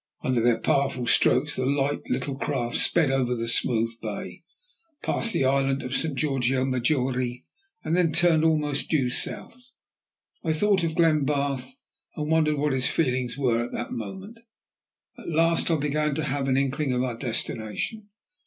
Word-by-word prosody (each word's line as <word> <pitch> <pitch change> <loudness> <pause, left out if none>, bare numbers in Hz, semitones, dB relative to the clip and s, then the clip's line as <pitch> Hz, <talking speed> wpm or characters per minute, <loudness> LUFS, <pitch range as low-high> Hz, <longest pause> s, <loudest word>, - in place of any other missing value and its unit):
Under 125 -2 +1
their 120 0 +3
powerful 135 -3 0
strokes 150 +4 +3
the 130 - 0
light 140 +1 0
little 140 - -2
craft 130 -4 -2
sped 160 -6 +3
over 125 -2 +1
the 115 0 -3
smooth 115 -1 +1
bay, - - -6 0.6
passed 230 - +1
the 135 - +1
island 135 0 +1
of 125 - -5
St. 155 0 0
Georgio 135 -3 +1
Maggiore, 125 -1 -1 0.4
and 165 - 0
then 175 -3 +2
turned 165 -1 +3
almost 150 -3 +1
due 135 -6 +1
south. 245 - -5 0.7
Then 160 - +1
I - - -4
thought 200 -1 +2
of 160 -1 -1
Glenbarth, 145 - +1 0.4
and 150 -1 -3
wondered 155 -2 +2
what 145 0 0
his 130 -1 +1
feelings 125 -4 0
were 120 -4 +1
at 120 - -7
that 120 - -4
moment. 190 - -7 0.8
At - - -8
last 165 +1 +2
I 165 - +3
began 150 0 0
to 160 - -2
have 140 -1 -2
an 130 -1 +2
inkling 140 0 0
of 125 0 0
our 125 -2 -2
destination. 115 - -4
140 Hz, 165 wpm, -25 LUFS, 125-155 Hz, 0.8 s, their